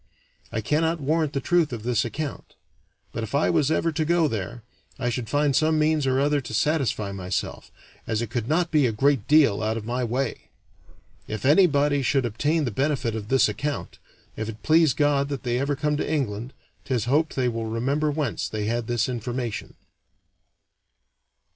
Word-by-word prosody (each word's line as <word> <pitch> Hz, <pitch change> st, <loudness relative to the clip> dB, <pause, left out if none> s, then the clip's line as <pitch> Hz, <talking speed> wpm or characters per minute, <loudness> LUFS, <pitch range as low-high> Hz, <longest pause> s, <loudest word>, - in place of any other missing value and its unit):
I 110 Hz, -, -2 dB
cannot 160 Hz, +7 st, +1 dB
warrant 155 Hz, +1 st, 0 dB
the 140 Hz, -, 0 dB
truth 170 Hz, +1 st, +2 dB
of 115 Hz, -3 st, -5 dB
this 120 Hz, -2 st, +1 dB
account; 140 Hz, +5 st, -5 dB, 0.6 s
but -, -, -4 dB
if 110 Hz, +5 st, -4 dB
I 145 Hz, -, +3 dB
was 155 Hz, -4 st, +2 dB
ever 165 Hz, +1 st, +1 dB
to 155 Hz, 0 st, -1 dB
go 170 Hz, 0 st, +3 dB
there, 110 Hz, -1 st, -4 dB, 0.3 s
I 120 Hz, -2 st, -1 dB
should 120 Hz, -2 st, -4 dB
find 145 Hz, -1 st, +2 dB
some 155 Hz, +2 st, +3 dB
means 155 Hz, -2 st, +2 dB
or 130 Hz, 0 st, +2 dB
other 145 Hz, +1 st, +2 dB
to 110 Hz, -3 st, -6 dB
satisfy 130 Hz, -8 st, 0 dB
myself, 95 Hz, -1 st, -4 dB, 0.4 s
as 110 Hz, -2 st, 0 dB
it 115 Hz, -2 st, -4 dB
could 115 Hz, -1 st, -2 dB
not 170 Hz, +3 st, +1 dB
be 150 Hz, -5 st, +4 dB
a -, -, 0 dB
great 135 Hz, +1 st, +1 dB
deal 145 Hz, -9 st, +4 dB
out 110 Hz, +1 st, -1 dB
of 110 Hz, -, -6 dB
my 125 Hz, +2 st, -2 dB
way. 125 Hz, +2 st, -3 dB, 0.8 s
If 110 Hz, +3 st, -5 dB
anybody 145 Hz, -3 st, +4 dB
should 135 Hz, 0 st, +1 dB
obtain 145 Hz, +8 st, 0 dB
the 120 Hz, -, -2 dB
benefit 130 Hz, -1 st, -1 dB
of 105 Hz, -2 st, -5 dB
this 130 Hz, 0 st, +4 dB
account, 140 Hz, +8 st, -4 dB, 0.4 s
if 110 Hz, 0 st, -4 dB
it 110 Hz, -1 st, -9 dB
please 160 Hz, -2 st, +4 dB
God 145 Hz, -1 st, +2 dB
that 140 Hz, -3 st, -4 dB
they 120 Hz, -1 st, 0 dB
ever 140 Hz, +1 st, 0 dB
come 150 Hz, +1 st, 0 dB
to 150 Hz, -, -2 dB
England, 125 Hz, -5 st, -2 dB, 0.3 s
'tis 125 Hz, -5 st, -1 dB
hoped 150 Hz, +6 st, +1 dB
they 130 Hz, -2 st, +1 dB
will 115 Hz, -2 st, -2 dB
remember 135 Hz, +7 st, 0 dB
whence 145 Hz, -4 st, -2 dB
they 105 Hz, -1 st, -3 dB
had 115 Hz, +1 st, -1 dB
this 120 Hz, -2 st, 0 dB
information." 120 Hz, -1 st, -4 dB
135 Hz, 185 wpm, -25 LUFS, 115-150 Hz, 0.8 s, be